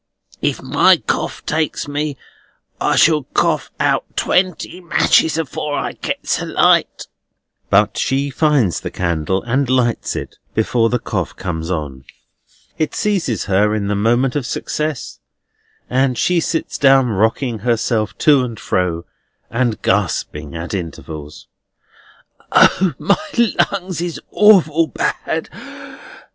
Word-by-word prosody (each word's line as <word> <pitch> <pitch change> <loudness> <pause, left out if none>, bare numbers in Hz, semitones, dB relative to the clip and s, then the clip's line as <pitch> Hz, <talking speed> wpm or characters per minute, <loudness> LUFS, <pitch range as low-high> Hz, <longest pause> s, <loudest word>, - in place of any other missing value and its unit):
If - - -1
my - - +4
cough - - -3
takes 155 -1 -1
me, 145 0 -3 0.6
I - - +1
shall 155 -4 +4
cough - - +1
out - - +2
twenty 185 0 0
matches 160 -2 +3
afore 150 -2 -3
I - - -2
gets - - -3
a - - -3
light." - - +2 0.6
But 105 +1 +3
she 140 +2 0
finds 140 - +2
the - - -4
candle, 85 +1 -1
and 130 +2 0
lights 125 -3 0
it, - - -6 0.2
before 115 +1 +2
the 125 - +1
cough - - -4
comes 80 -3 -4
on. 75 -7 -4 0.8
It 155 - -1
seizes 190 - 0
her 105 +2 +2
in 100 -2 -2
the 105 - 0
moment 120 +5 +1
of 140 -4 -2
success, 150 -4 -4 0.7
and 130 -1 +1
she 180 +6 +2
sits 165 0 -2
down 135 -2 +5
rocking 110 +3 0
herself 115 -2 0
to 145 -4 +6
and 115 -3 -6
fro, 85 -2 -1 0.5
and 115 -2 0
gasping 75 +1 -1
at 85 +4 -5
intervals: 80 -4 -7 1.1
"O, 185 -3 +4
my 270 -7 +1 0.2
lungs 185 -4 -4
is 175 -2 -4
awful 165 -7 +5
bad! - - -2
125 Hz, 130 wpm, -18 LUFS, 100-155 Hz, 1.1 s, to